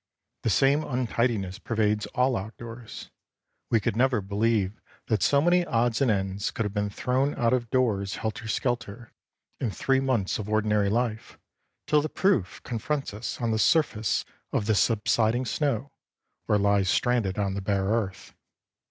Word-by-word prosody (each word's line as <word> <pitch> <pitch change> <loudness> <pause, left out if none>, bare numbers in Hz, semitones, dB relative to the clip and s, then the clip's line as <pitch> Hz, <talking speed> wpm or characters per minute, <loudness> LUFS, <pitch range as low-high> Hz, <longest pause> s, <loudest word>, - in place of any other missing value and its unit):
The - - 0
same 140 +8 +3
untidiness 115 -7 -1
pervades 105 -2 0
all 125 +1 +2
outdoors. 115 +3 -8 0.6
We 115 - +3
could 100 - -1
never 125 -1 +3
believe 105 0 0 0.2
that 110 -2 0
so 140 -1 +4
many 175 +1 +4
odds 115 -6 0
and 135 - +3
ends 95 0 -1
could 115 - -3
have 105 - -3
been 105 -1 -1
thrown 130 +7 0
out 120 -1 +2
of 120 -3 0
doors 105 -7 +1
helter 110 0 -4
skelter, 120 0 -3 0.5
in 120 - -1
three 135 +6 +1
months 125 -9 0
of 105 0 -5
ordinary 105 -1 +2
life, 115 0 -2 0.5
till 150 -1 +3
the 155 - -3
proof 135 - 0
confronts 135 +2 -3
us 105 +3 -5
on 115 -1 0
the 110 - 0
surface 115 - +2 0.3
of 105 - 0
the 110 - +2
subsiding 115 +3 +2
snow 140 -2 -1 0.6
or 105 - +3
lies 100 -2 +2
stranded 115 -6 +1
on 100 -2 0
the 100 - -3
bare 95 0 0
earth. 100 -2 -2
115 Hz, 160 wpm, -27 LUFS, 105-125 Hz, 0.6 s, so